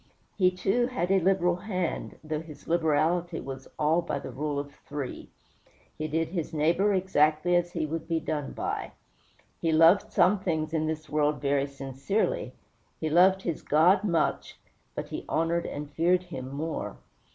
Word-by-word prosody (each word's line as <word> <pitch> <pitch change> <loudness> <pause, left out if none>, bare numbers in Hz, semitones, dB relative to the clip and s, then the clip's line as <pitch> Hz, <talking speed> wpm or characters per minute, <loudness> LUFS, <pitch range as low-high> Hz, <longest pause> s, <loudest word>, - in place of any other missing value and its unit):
He 185 -2 +4
had, 180 - -11
too, 240 +7 +1
a 195 -6 +2
liberal 180 -1 +2
hand, 185 -3 -3
though 155 -1 -2
his 155 -3 -12
liberality 165 +1 +1
was 135 0 -7
all 155 +3 +3
by 170 - -3
the - - -7
rule 145 +3 -3
of 140 0 -4
three. 140 -4 -5 0.7
He 155 - -3
did 160 +1 -1
by - - -14
his 165 -3 -3
neighbor 170 +7 +3
exactly 175 -3 +2
as 175 0 +1
he 165 -3 -1
would 160 +1 -4
be 165 -1 +1
done 150 -3 -3
by. - - -3 0.7
He 165 - +1
loved 165 +5 +5
some 205 +2 +4
things 160 -4 -2
in 155 -1 0
this 155 -1 -4
world 150 0 +1
very 140 0 +1
sincerely; 140 +9 -2 0.5
he 155 -1 -2
loved 190 +3 +5
his 170 -3 -2
God 180 +6 +4
much, 170 -6 0 0.4
but - - -5
he - - -5
honored 165 +1 0
and 145 +1 -5
feared 175 +5 +2
him 130 -8 -7
more. 155 +3 -4
165 Hz, 170 wpm, -28 LUFS, 150-180 Hz, 0.7 s, loved